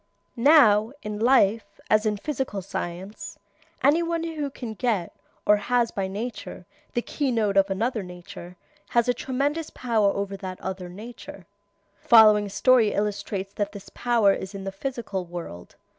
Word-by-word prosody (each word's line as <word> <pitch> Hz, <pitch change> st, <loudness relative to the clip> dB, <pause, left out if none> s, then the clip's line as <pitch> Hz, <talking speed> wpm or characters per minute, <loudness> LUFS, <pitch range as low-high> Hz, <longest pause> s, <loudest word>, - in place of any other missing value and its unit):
Now, 235 Hz, -4 st, +5 dB
in 210 Hz, -1 st, -5 dB
life, 225 Hz, -3 st, +2 dB
as 215 Hz, +1 st, +3 dB
in 210 Hz, -1 st, 0 dB
physical 260 Hz, -5 st, -3 dB
science, 190 Hz, +2 st, -6 dB, 0.5 s
any 295 Hz, +5 st, +5 dB
one 335 Hz, -1 st, -1 dB
who 310 Hz, -4 st, -3 dB
can 245 Hz, -4 st, -7 dB
get, 215 Hz, -6 st, -1 dB, 0.3 s
or 210 Hz, -, +5 dB
has 235 Hz, +3 st, +1 dB
by 195 Hz, -1 st, -2 dB
nature, 220 Hz, +6 st, -6 dB, 0.3 s
the 240 Hz, -, 0 dB
key 285 Hz, -2 st, -2 dB
note 215 Hz, -4 st, +1 dB
of 195 Hz, 0 st, +4 dB
another 220 Hz, +4 st, -1 dB
nature, 180 Hz, -1 st, -10 dB, 0.3 s
has 235 Hz, 0 st, +2 dB
a 245 Hz, -, +3 dB
tremendous 280 Hz, +6 st, -2 dB
power 225 Hz, -5 st, +1 dB
over 200 Hz, 0 st, -3 dB
that 185 Hz, -1 st, -7 dB
other 185 Hz, -1 st, -5 dB
nature. 205 Hz, -1 st, -10 dB, 0.6 s
The -, -, -26 dB
following 215 Hz, -3 st, +7 dB
story 240 Hz, +1 st, +4 dB
illustrates 200 Hz, -1 st, -3 dB
what 205 Hz, 0 st, -2 dB
this 200 Hz, -2 st, -10 dB
power 230 Hz, -5 st, +2 dB
is 190 Hz, +1 st, -6 dB
in 195 Hz, -, -6 dB
the 195 Hz, -, -4 dB
physical 215 Hz, -3 st, -4 dB
world. 170 Hz, -, -9 dB
210 Hz, 160 wpm, -25 LUFS, 195-245 Hz, 0.6 s, following